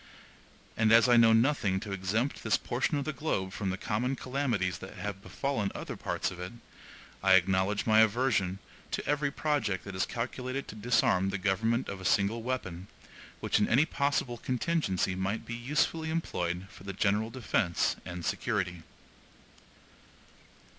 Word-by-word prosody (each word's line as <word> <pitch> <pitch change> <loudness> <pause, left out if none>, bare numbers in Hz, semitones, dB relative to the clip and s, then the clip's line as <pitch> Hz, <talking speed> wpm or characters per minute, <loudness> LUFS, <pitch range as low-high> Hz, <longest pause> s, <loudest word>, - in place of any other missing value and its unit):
And 110 -1 +3
as 115 +2 +7
I 120 - +6
know 115 -1 +7
nothing 115 -5 +3
to 105 - -6
exempt 100 +8 -1
this 110 - +2
portion 130 +4 -1
of 140 - -2
the 155 - -2
globe 100 -10 -2
from 100 - -2
the 95 - -2
common 120 +7 -1
calamities 125 -9 -1
that 95 - -9
have 100 -2 -5
befallen 115 -2 -2
other - - -5
parts - - -2
of 90 - -9
it, 90 +3 -6 0.7
I 95 0 +5
acknowledge 95 +2 +2
my 110 -1 +5
aversion 110 -4 +2 0.3
to - - -3
every 145 0 +1
project 140 - -1
that 100 - -7
is 95 +1 0
calculated 130 +3 -4
to - - -6
disarm 105 -4 +2
the 95 - -2
government 110 +6 +1
of 95 -1 -6
a 95 - +2
single 100 +4 +1
weapon, 100 -8 -4 0.5
which - - +2
in 105 - +2
any 135 +6 +5
possible 140 -6 -1
contingency 125 - 0
might 95 +4 -2
be 120 - -6
usefully 150 +6 0
employed 90 - -2
for 95 - -14
the 100 0 -5
general 105 +3 +1
defense 115 -7 0
and 90 0 -6
security. 90 -2 -1
110 Hz, 160 wpm, -30 LUFS, 95-130 Hz, 0.7 s, as